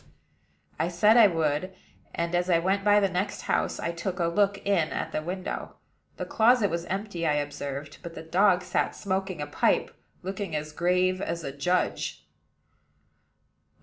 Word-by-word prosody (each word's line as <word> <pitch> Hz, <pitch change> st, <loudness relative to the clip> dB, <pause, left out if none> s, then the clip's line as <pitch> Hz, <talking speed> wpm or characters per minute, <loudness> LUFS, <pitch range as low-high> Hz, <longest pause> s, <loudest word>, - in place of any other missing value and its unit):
I 165 Hz, -, +1 dB
said 195 Hz, +6 st, +4 dB
I 230 Hz, -3 st, +8 dB
would; 165 Hz, +1 st, -1 dB, 0.4 s
and, 170 Hz, +1 st, -2 dB
as 175 Hz, +1 st, +1 dB
I 170 Hz, -, +5 dB
went 190 Hz, +4 st, 0 dB
by 205 Hz, 0 st, +5 dB
the 200 Hz, -, +3 dB
next 190 Hz, +2 st, -2 dB
house, -, -, -1 dB
I 170 Hz, -, -2 dB
took 175 Hz, +2 st, -4 dB
a 175 Hz, -, +1 dB
look 200 Hz, +4 st, +2 dB
in 185 Hz, -6 st, +2 dB
at -, -, -3 dB
the -, -, -2 dB
window. 180 Hz, +3 st, -5 dB, 0.4 s
The -, -, -3 dB
closet 225 Hz, -3 st, +3 dB
was 170 Hz, 0 st, -2 dB
empty, 190 Hz, -2 st, -3 dB
I 150 Hz, -, +3 dB
observed; 145 Hz, -1 st, -4 dB
but 170 Hz, -1 st, -8 dB
the 160 Hz, -, -7 dB
dog 180 Hz, +2 st, +3 dB
sat 180 Hz, -, -1 dB
smoking 190 Hz, -5 st, -2 dB
a -, -, -3 dB
pipe, -, -, +1 dB, 0.3 s
looking 190 Hz, -2 st, -4 dB
as 150 Hz, 0 st, -3 dB
grave 180 Hz, +3 st, +1 dB
as 170 Hz, -3 st, -3 dB
a 140 Hz, -, -4 dB
judge. 180 Hz, +7 st, -1 dB
180 Hz, 170 wpm, -27 LUFS, 165-195 Hz, 0.4 s, I